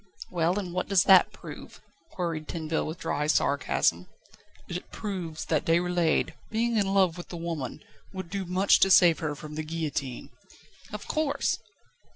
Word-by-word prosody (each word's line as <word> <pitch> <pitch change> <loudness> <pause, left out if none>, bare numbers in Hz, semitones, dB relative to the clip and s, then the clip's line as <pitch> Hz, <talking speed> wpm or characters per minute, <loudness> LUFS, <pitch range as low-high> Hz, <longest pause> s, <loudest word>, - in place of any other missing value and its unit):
"Well, 175 +1 +1
and 185 -4 -4
what 185 - -2
does 195 -2 +4
that 190 -2 +6
prove?" - - -11 0.3
queried 165 -4 -3
Tinville 160 -1 -2
with 160 +2 -5
dry 150 -1 -2
sarcasm. 130 - +1 0.6
"It 175 +1 -6
proves 180 -7 -5
that 155 -3 0
Déroulède, 170 0 +1 0.2
being 230 +1 0
in 200 -2 +1
love 185 -3 +3
with 175 - -9
the 175 - -6
woman, 165 -6 -5 0.3
would 185 -3 -7
do 200 -1 -2
much 185 +3 +4
to 195 - +5
save 175 -3 +6
her 150 -2 -2
from 150 +1 -9
the 155 +1 -3
guillotine." 155 -5 -4 0.6
"Of - - -7
course." 305 -3 0
170 Hz, 160 wpm, -27 LUFS, 155-190 Hz, 0.6 s, that